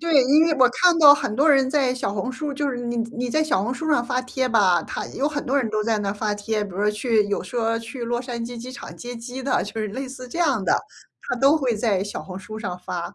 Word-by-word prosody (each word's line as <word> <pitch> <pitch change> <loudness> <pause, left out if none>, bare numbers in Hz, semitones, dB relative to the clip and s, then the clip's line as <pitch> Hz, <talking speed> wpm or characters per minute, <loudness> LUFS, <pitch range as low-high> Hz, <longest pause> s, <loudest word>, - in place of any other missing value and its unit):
对， 330 -4 +4
因 300 +5 +5
为 330 - +2
我 255 -1 +7
看 340 +6 +3
到 290 -2 +9
很 220 -7 -3
多 285 +6 +3
人 270 -3 +4
在 270 -4 +2
小 250 - -2
红 210 +6 -3
书 290 +2 -4
就 285 0 -1
是 250 - -4
你 240 0 -3 0.2
你 245 0 -2
在 310 +3 +2
小 245 -11 +1
红 245 +4 -2
书 315 +3 -3
上 245 -5 +2
发 255 0 -1
帖 255 +1 -2
吧， 190 -7 +3
他 - - -5
有 280 - -2
很 295 -1 -4
多 275 +3 +1
人 250 -5 +1
都 215 0 0
在 220 -1 0
那 200 -1 -2
发 210 0 -2
帖。 210 +1 -2
比 200 - -6
如 205 +3 +1
去 215 0 +1
有 205 - -2
说 230 -1 -1
去 235 +2 -7
洛 240 +1 -1
杉 240 -2 -5
矶 240 0 -7
机 250 +2 -7
场 255 - -9
接 245 0 -8
机 245 +3 -7
的， 265 - +1
就 220 +2 -5
是 215 - -2
类 260 +6 -5
似 255 -1 -9
这 335 - -6
样 280 - +2
的， - - +2 0.5
他 485 - -3
都 275 +5 +4
会 255 -6 0
在 205 -3 0
小 205 - -6
红 185 0 -8
书 215 +3 -8
上 180 -5 -5
发。 180 +1 -5
245 Hz, 295 characters per minute, -23 LUFS, 215-270 Hz, 0.5 s, 到